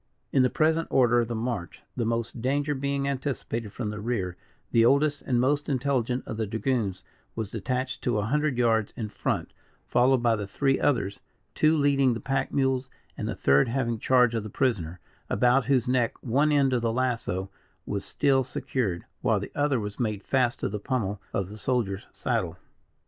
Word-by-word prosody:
In 135 - +5
the 125 - +4
present 160 +3 +2
order 120 -2 +4
of 120 - +1
the 120 - -3
march, 110 -6 -4
the 120 - -1
most 115 0 -2
danger 145 +4 +1
being 140 0 -1
anticipated 130 -5 -3
from 110 -1 -4
the 105 - -6
rear, 105 -5 -2 0.4
the 115 - +5
oldest 145 +4 +3
and 125 -2 0
most 145 +4 +1
intelligent 130 -2 0
of 110 - -5
the 110 -1 -1
dragoons 115 -3 -1 0.3
was 110 -3 -4
detached 125 +4 -2
to 120 -3 0
a 105 - 0
hundred 150 +2 0
yards 115 -3 +2
in 110 -3 -3
front, - - -2 0.3
followed 125 0 +3
by 115 -1 +4
the 105 -2 -4
three 135 +6 +1
others; 100 -8 0 0.3
two 155 +1 +3
leading 140 -4 +3
the - - -4
pack 135 0 -1
mules, 130 -1 +1 0.3
and - - -4
the - - -3
third 70 +1 +4
having 120 -2 -1
charge 125 -1 +4
of 115 - 0
the 105 - -7
prisoner, 95 - -1 0.3
about 125 +1 +3
whose 130 -2 +2
neck 125 -2 +1
one 140 +6 +2
end 140 -3 +3
of 125 - +1
the 115 -1 +1
lasso 115 -6 -1 0.3
was 100 -1 -3
still 135 -2 +2
secured, 120 -7 -2 0.2
while - - +2
the - - -7
other 145 -3 +1
was 105 -1 -6
made 110 -4 -1
fast 125 -3 +1
to - - 0
the 105 +1 -4
pummel 105 -4 -2
of 100 -2 -1
the 105 +1 -9
soldier's 110 -7 -1
saddle. 85 -1 -2
125 Hz, 190 wpm, -27 LUFS, 110-135 Hz, 0.4 s, In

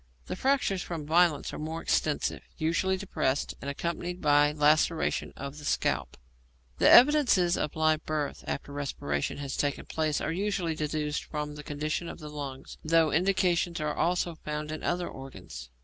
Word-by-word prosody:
The - - -4
fractures 255 -6 +1
from 165 -5 -5
violence 160 -1 +3
are - - -5
more 160 +2 -4
extensive, 155 -2 0 0.2
usually 170 +4 +1
depressed, 145 -8 -1
and 140 - -4
accompanied 170 +4 -3
by 145 -1 +4
laceration 155 +2 +2
of 140 +2 -6
the - - -11
scalp. - - -1 0.6
The - - +6
evidences 245 - +6
of 150 - -2
live 155 0 +2
birth 150 -2 -2
after 140 - -4
respiration 75 - -2
has 140 -1 -4
taken 145 -1 -1
place 155 -2 -1
are - - -2
usually 185 -2 -1
deduced 150 -1 -2
from 150 -1 -4
the 150 - -8
condition 155 +3 -3
of - - -8
the 150 -2 -9
lungs, 140 -2 -7
though 160 -1 +3
indications 175 0 +1
are 150 -1 -1
also 175 0 0
found 150 0 -4
in 155 - -5
other 175 0 -1
organs. 80 - -9
155 Hz, 165 wpm, -29 LUFS, 145-175 Hz, 0.6 s, The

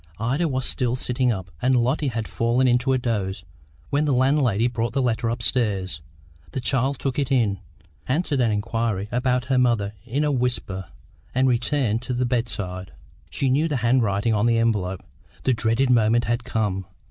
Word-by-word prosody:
Ida 135 +10 0
was 130 -3 -2
still 125 -2 -1
sitting 125 0 0
up, 95 -5 -5
and 130 +1 +3
Lotty 130 +5 +1
had 115 -3 -2
fallen 120 +3 +1
into 125 +2 +2
a 130 - +3
doze, 100 -7 -2 0.5
when 145 +2 +2
the 145 - +2
landlady 130 -4 +2
brought 120 -1 -2
the 135 - +1
letter 120 -1 0
upstairs. 105 -7 -1 0.5
The - - -2
child 135 +2 0
took 135 +1 -2
it 140 -2 -1
in, 110 -7 +2 0.5
answered 145 -1 0
an 120 - +3
inquiry 105 -1 -1
about 125 0 +1
her 130 -1 +2
mother 115 -5 +1
in 130 +5 -1
a 150 - +1
whisper, 120 -8 -2 0.5
and 130 +1 +3
returned 120 -2 +1
to 125 0 -3
the 125 +1 +1
bedside. 105 -7 -3 0.4
She 135 - -1
knew 150 +5 +2
the 150 -4 -1
handwriting 115 -3 +2
on 105 +2 +2
the 115 -1 +3
envelope. 100 -5 0 0.4
The 130 - +3
dreaded 115 +3 +1
moment 115 0 +3
had 120 +1 -1
come. 100 -5 -2
120 Hz, 175 wpm, -23 LUFS, 110-130 Hz, 0.5 s, and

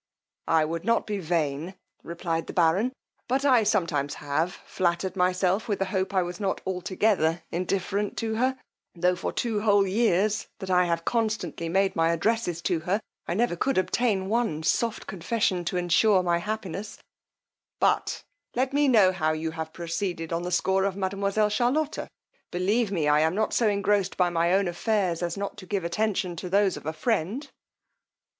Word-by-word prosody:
I 160 -1 +3
would 165 +1 -4
not 230 0 +2
be 205 -2 -3
vain, 165 0 -1 0.3
replied 170 -1 -3
the - - -6
baron, 180 +8 +3 0.4
but 265 +3 0
I 255 -4 +5
sometimes 165 -9 0
have 150 +5 -1
flattered 180 +1 -1
myself 185 +3 +1
with 205 -3 0
the 195 - 0
hope 190 0 0
I 185 - +4
was 175 0 -6
not 195 -2 -1
altogether 180 -2 0
indifferent 195 +3 -1
to 225 -1 -1
her; 255 +4 +1 0.4
tho' 180 +1 +2
for - - -3
two 225 -4 -1
whole 205 -2 +4
years 210 0 +1
that 190 -2 -5
I 180 0 +4
have 170 -1 -1
constantly 215 -8 -1
made 195 +2 +2
my 165 0 +3
addresses 175 -1 0
to 175 -3 +1
her, 180 +6 0 0.3
I 170 - -1
never 230 -3 +1
could 270 +10 0
obtain 195 0 +1
one 215 -8 0
soft 225 +8 0
confession 190 0 -1
to 180 +2 -1
assure 185 +3 +3
my 170 -1 +1
happiness: 210 0 -5 0.8
but - - +1 0.3
let 260 +2 0
me 290 0 +3
know 210 -8 +6
how 155 -4 0
you 160 +1 -3
have 160 -1 -5
proceeded 170 0 -3
on 165 - -1
the 180 +1 -4
score 190 +1 +2
of 195 -1 0
mademoiselle 200 +2 0
Charlotta? 265 +8 0 0.4
believe 200 +5 +1
me, 165 -6 0
I 150 0 +4
am 160 +3 +2
not 215 +1 0
so 230 -3 +3
engrossed 200 -1 +1
by 180 -1 +2
my 170 0 +2
own 195 0 +3
affairs, 180 -1 0
as 170 0 -2
not 200 +1 -4
to 185 -3 -10
give 200 -2 -1
attention 185 0 -1
to 180 - -5
those 195 0 +3
of - - -9
a - - 0
friend. 220 - -1
190 Hz, 180 wpm, -26 LUFS, 170-210 Hz, 0.8 s, know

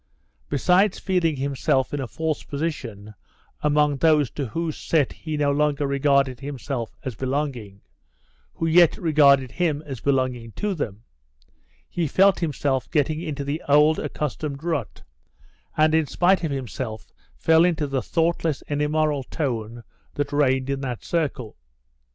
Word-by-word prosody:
Besides 180 +8 +3
feeling 175 -5 0
himself 135 -1 0
in 145 - -1
a 130 - -4
false 160 +7 -2
position 120 -9 -5 0.5
among 150 -1 +2
those 150 -3 +3
to 140 -3 -4
whose 160 +7 -3
set 150 -5 0
he 155 -2 -5
no 145 -1 +2
longer 145 0 +1
regarded 140 -2 +2
himself 135 -3 -5
as 130 - -3
belonging, 130 -6 -3 0.7
who 165 - -2
yet 165 0 +5
regarded 140 -5 +4
him 160 -4 -1
as 135 -5 -6
belonging 125 -4 -1
to 210 -1 -2
them, 115 - -5 0.8
he 170 -2 -2
felt 195 +6 +4
himself 140 -6 -1
getting 155 +1 0
into 150 -4 -4
the 145 +3 -3
old 150 +2 +5
accustomed 150 -1 -4
rut, 160 -9 -3 0.7
and 155 0 +4
in 160 -2 +2
spite 180 +4 +2
of 160 - 0
himself 125 -5 -5 0.3
fell 160 0 +4
into 165 -4 +1
the 135 -2 -1
thoughtless 165 -2 0
and 145 0 -1
immoral 150 -1 +1
tone 120 -5 -4 0.3
that 145 0 -2
reigned 130 -2 +2
in 135 0 -2
that 125 -4 -4
circle. 140 - -2
145 Hz, 145 wpm, -24 LUFS, 130-160 Hz, 0.8 s, yet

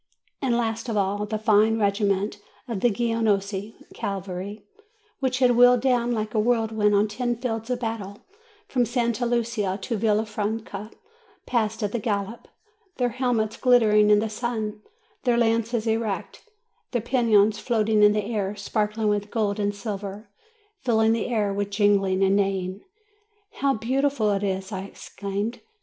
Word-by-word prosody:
And 250 -4 +1
last 225 0 -2
of 220 - -1
all, 205 +1 0
the 215 +1 -2
fine 215 0 +3
regiment 200 0 0 0.3
of 230 -5 -3
the 240 - +3
Genoese 210 -2 -1 0.2
cavalry, 195 +1 -5 0.5
which 260 -2 0
had 250 -1 +4
wheeled 245 0 +6
down 245 -2 +2
like 215 -2 -2
a 220 - +2
whirlwind 220 -2 +2
on 205 +2 +3
ten 240 +3 -2
fields 225 -1 -4
of 250 -1 -2
battle, 210 -3 -5 0.4
from 250 -2 +1
Santa 240 0 0
Lucia 230 -5 -1
to 230 +3 -3
Villa 215 +1 +2
franca, 215 -1 -4 0.6
passed 220 -2 -1
at 205 - -2
a 240 - 0
gallop, 205 +1 -3 0.5
their 245 -1 +1
helmets 235 -3 -1
glittering 215 -4 +4
in 210 - +6
the 220 +2 0
sun, 215 -2 -3 0.4
their 245 -2 +2
lances 230 0 +1
erect, 225 - -3 0.4
their 245 - -1
pennons 220 -4 +3
floating 220 -2 +1
in 210 0 +6
the 210 -1 -1
air, 205 -3 -2
sparkling 210 +1 -1
with 205 0 0
gold 210 -2 -1
and 205 0 0
silver, 205 0 -6 0.5
filling 225 -3 +2
the 225 0 0
air 215 -5 0
with 200 0 -2
jingling 195 -2 +2
and 195 0 +3
neighing. 195 -1 -1 0.7
"How 275 -1 0
beautiful 255 0 +1
it 195 -1 0
is!" 190 -1 -2
I 190 -2 -3
exclaimed. 200 +3 -5
215 Hz, 155 wpm, -25 LUFS, 205-235 Hz, 0.7 s, wheeled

